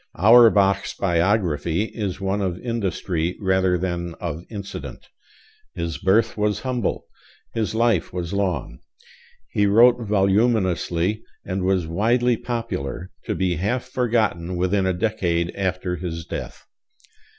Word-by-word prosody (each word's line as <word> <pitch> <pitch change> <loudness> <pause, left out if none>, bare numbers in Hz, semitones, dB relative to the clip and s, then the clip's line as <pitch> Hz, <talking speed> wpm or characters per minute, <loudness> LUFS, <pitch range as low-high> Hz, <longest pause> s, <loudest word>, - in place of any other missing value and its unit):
Auerbach's 100 -1 +5
biography 85 -2 +1
is 105 -4 -4
one 100 +1 -1
of 90 -3 -1
industry 95 -7 -2
rather 95 -2 +2
than 85 -1 -3
of 85 -1 -5
incident. 100 -3 -8 0.7
His 85 -1 -3
birth 110 +4 +2
was 105 -1 0
humble. 125 -5 -2 0.5
His 110 -1 -2
life 115 -6 +2
was 90 0 -4
long. 90 -11 -2 0.7
He 105 -1 +2
wrote 120 +4 +6
voluminously 100 -2 +1 0.2
and 95 0 -2
was 95 -2 +1
widely 115 +8 +2
popular, 110 - -4
to - - -2
be 90 -3 0
half 110 +9 -1
forgotten 110 -9 0
within 95 +2 +1
a 95 - +1
decade 90 -4 0
after 90 -2 -2
his 85 -2 -5
death. - - -7
95 Hz, 120 wpm, -23 LUFS, 90-110 Hz, 0.7 s, wrote